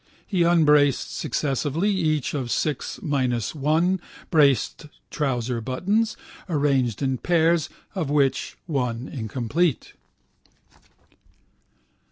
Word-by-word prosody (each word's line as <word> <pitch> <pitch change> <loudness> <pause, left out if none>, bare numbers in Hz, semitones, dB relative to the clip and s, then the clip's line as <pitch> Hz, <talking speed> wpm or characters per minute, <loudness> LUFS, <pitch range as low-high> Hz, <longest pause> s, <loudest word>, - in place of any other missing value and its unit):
He 185 -4 0
unbraced 150 -5 +4
successively 150 +7 -1
each 155 -7 0
of 130 -5 -3
six 150 +2 -2
minus 130 - 0
one 160 +5 +1 0.3
braced 150 - +2 0.2
trouser 125 -4 -1
buttons, 200 - 0 0.3
arranged 140 -6 +1
in 130 -2 0
pairs, 170 -2 +2 0.2
of 175 -8 -2
which 140 -2 +1
one 125 -5 -2
incomplete. 130 +6 -1
145 Hz, 90 wpm, -24 LUFS, 130-165 Hz, 0.3 s, unbraced